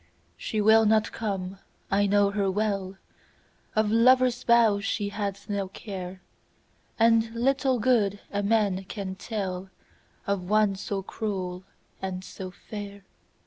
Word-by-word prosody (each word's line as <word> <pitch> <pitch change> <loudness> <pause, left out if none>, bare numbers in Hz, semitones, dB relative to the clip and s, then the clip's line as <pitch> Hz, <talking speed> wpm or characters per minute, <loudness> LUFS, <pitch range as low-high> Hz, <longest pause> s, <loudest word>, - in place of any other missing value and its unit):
She 210 - -2
will 220 +1 +6
not 220 0 +3
come, 195 -3 -4 0.3
I 200 +1 +3
know 200 0 +3
her 200 -1 0
well, 195 -1 -1 0.8
Of 215 -1 +2
lover's 250 +2 +4
vows 225 -4 +4
she 205 -1 -1
hath 200 -1 -4
no 200 -2 -2
care, 185 -2 -8 0.7
And 225 0 +4
little 260 +1 +2
good 210 -4 +2
a 205 - -1
man 200 -3 +1
can 190 -1 -5
tellOf 190 -3 -4 0.6
one 200 +1 +1
so 195 0 -4
cruel 185 -4 -4 0.4
and 185 -1 -4
so 190 0 -7
fair. 200 +1 -9
205 Hz, 125 wpm, -27 LUFS, 195-220 Hz, 0.8 s, will